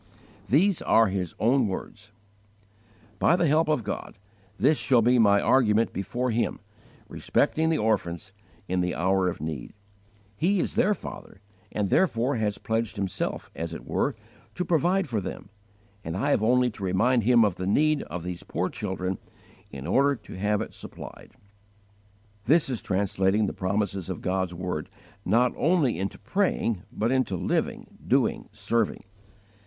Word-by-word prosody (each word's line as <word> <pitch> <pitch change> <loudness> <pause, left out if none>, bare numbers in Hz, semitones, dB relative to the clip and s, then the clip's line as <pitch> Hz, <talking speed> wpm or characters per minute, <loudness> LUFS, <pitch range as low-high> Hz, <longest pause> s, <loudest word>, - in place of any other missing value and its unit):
These 180 +7 +3
are 115 -2 +4
his 95 -3 -3
own 125 +1 +3
words: 105 +2 -7 1.1
"By 175 - +4
the 175 - +2
help 155 +2 +3
of 150 -6 +1
God, 100 +1 -5 0.4
this 145 +4 +3
shall 125 -4 +3
be 125 +2 +4
my 100 -2 +5
argument 115 -2 +3
before 120 +6 -2
Him, 115 +1 -1 0.5
respecting 160 +1 +1
the 160 - +2
orphans, 95 -4 -1 0.3
in 90 0 0
the 90 0 -1
hour 95 +1 +2
of 90 - -3
need. 80 -5 -5 0.6
He 190 - +1
is - - -1
their 210 +2 +3
Father, 95 - -10 0.3
and 100 -3 -1
therefore 130 -7 +2
has 105 -2 -1
pledged 115 0 -2
Himself, 95 -3 -3
as 85 0 -4
it - - -9
were, - - 0 0.4
to 180 - -2
provide 175 +3 +2
for 115 -6 -1
them; 95 - -7 0.5
and 80 +2 -4
I 140 +8 0
have - - +2
only 125 +2 +3
to 100 - -10
remind 115 +7 +2
Him 115 0 +5
of 95 -3 -1
the 95 - -3
need 150 +8 +3
of 85 +3 -6
these 90 -1 -5
poor - - -2
children 95 0 -3 0.5
in 70 0 -8
order 140 - +3
to - - -12
have 105 +2 0
it - - -10
supplied." - - -10 1.1
This 155 -1 +3
is 120 - -2
translating 95 +1 +1
the - - -3
promises 95 -1 -2
of 90 - -4
God's 95 -1 -1
word, 90 -3 -4 0.4
not 120 +5 +3
only 155 - +2
into 100 +1 -3
praying, 115 - 0
but 115 +3 -1
into 130 -7 +1
living, - - -1 0.2
doing, - - +1
serving. 105 +1 -1
110 Hz, 160 wpm, -26 LUFS, 95-130 Hz, 1.1 s, my